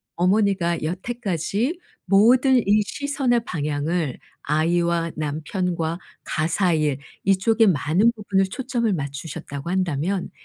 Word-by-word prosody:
어머니가 185 Hz, -2 st, +1 dB
여태까지 200 Hz, -, -2 dB, 0.3 s
모든 245 Hz, +7 st, +5 dB
이 210 Hz, +1 st, +4 dB
시선의 255 Hz, +3 st, 0 dB
방향을 150 Hz, -1 st, -2 dB, 0.2 s
아이와 170 Hz, +2 st, +1 dB
남편과 160 Hz, +3 st, -2 dB, 0.2 s
가사일 160 Hz, -3 st, 0 dB, 0.3 s
이쪽에 210 Hz, +4 st, +3 dB
많은 180 Hz, -, +3 dB
부분을 195 Hz, -2 st, +1 dB
초점을 235 Hz, +1 st, -2 dB
맞추셨다고 140 Hz, 0 st, -5 dB
한다면 180 Hz, 0 st, -1 dB
180 Hz, 260 characters per minute, -23 LUFS, 160-210 Hz, 0.3 s, 모든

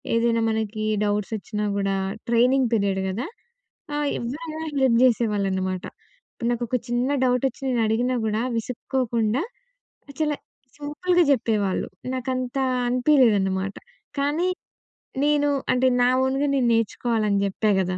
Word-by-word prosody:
ఏదైనా 230 Hz, 0 st, +2 dB
మనకి 220 Hz, -1 st, -2 dB, 0.2 s
డౌట్సొచ్చినా 210 Hz, +1 st, -2 dB
గూడా 195 Hz, -1 st, 0 dB, 0.3 s
ట్రైనింగ్ 250 Hz, +2 st, +3 dB
పీరియడ్ 200 Hz, -3 st, +1 dB
గదా! 215 Hz, +8 st, -3 dB, 0.7 s
ఆహ్, 295 Hz, 0 st, 0 dB
ఎవరైనా 310 Hz, +6 st, -5 dB, 0.2 s
హెల్ప్ 250 Hz, -3 st, +4 dB
చేసేవాళ్ళనమాట. 195 Hz, -6 st, 0 dB, 0.5 s
ఇప్పుడు 235 Hz, -2 st, -2 dB
నాకు 240 Hz, 0 st, -1 dB
ఒక 255 Hz, -, 0 dB
చిన్న 240 Hz, +2 st, 0 dB, 0.2 s
డౌటొచ్చి 250 Hz, +1 st, 0 dB
నేను 245 Hz, -3 st, +1 dB
అడిగినా 245 Hz, +4 st, +1 dB
గూడా, 215 Hz, 0 st, 0 dB, 0.2 s
విసుక్కోకుండా 235 Hz, -1 st, -1 dB, 0.8 s
చాల 305 Hz, -1 st, +1 dB, 0.4 s
సింపుల్‌గా 345 Hz, +5 st, +1 dB
చెప్పేవాళ్ళు. 220 Hz, -6 st, +1 dB, 0.3 s
నాకంతా 255 Hz, 0 st, -2 dB, 0.2 s
అనిపియలేదనమాట. 215 Hz, -8 st, +3 dB, 0.5 s
కానీ, 295 Hz, +6 st, +1 dB, 0.8 s
నేను 290 Hz, 0 st, +3 dB, 0.2 s
అంటే, 255 Hz, +1 st, +3 dB
నా 245 Hz, -, +5 dB
ఓన్‌గా 270 Hz, +2 st, +1 dB
నేను 255 Hz, -3 st, +2 dB
నేర్చుకోవాలని 220 Hz, -2 st, +1 dB
చెప్పా 210 Hz, +2 st, 0 dB
గదా! 185 Hz, -1 st, -1 dB
235 Hz, 115 wpm, -24 LUFS, 210-265 Hz, 0.8 s, నా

